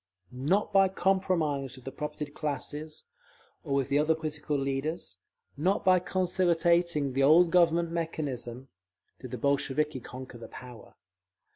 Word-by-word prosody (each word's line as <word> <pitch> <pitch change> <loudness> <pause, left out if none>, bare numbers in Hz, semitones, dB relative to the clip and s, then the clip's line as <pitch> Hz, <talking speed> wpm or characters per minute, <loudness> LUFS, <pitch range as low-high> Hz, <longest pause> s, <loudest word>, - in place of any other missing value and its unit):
Not 150 +12 0
by 195 -1 +6
compromise 175 -8 0
with 130 - -15
the 135 - -5
propertied 150 0 -5
classes, 150 +1 -4 0.6
or 140 -3 -1
with 135 -2 0
the 140 - +3
other 155 +2 +3
political 150 -2 -3
leaders; 140 +4 -3 0.4
not 180 +7 0
by 185 -1 +6
conciliating 170 -5 +1
the 135 - +1
old 165 +5 +6
Government 170 -1 +3
mechanism, 135 -7 -4 0.5
did - - -8
the - - -5
Bolsheviki 140 +1 0
conquer 125 0 -10
the - - -9
power. 125 -3 -12
150 Hz, 135 wpm, -29 LUFS, 135-170 Hz, 0.6 s, by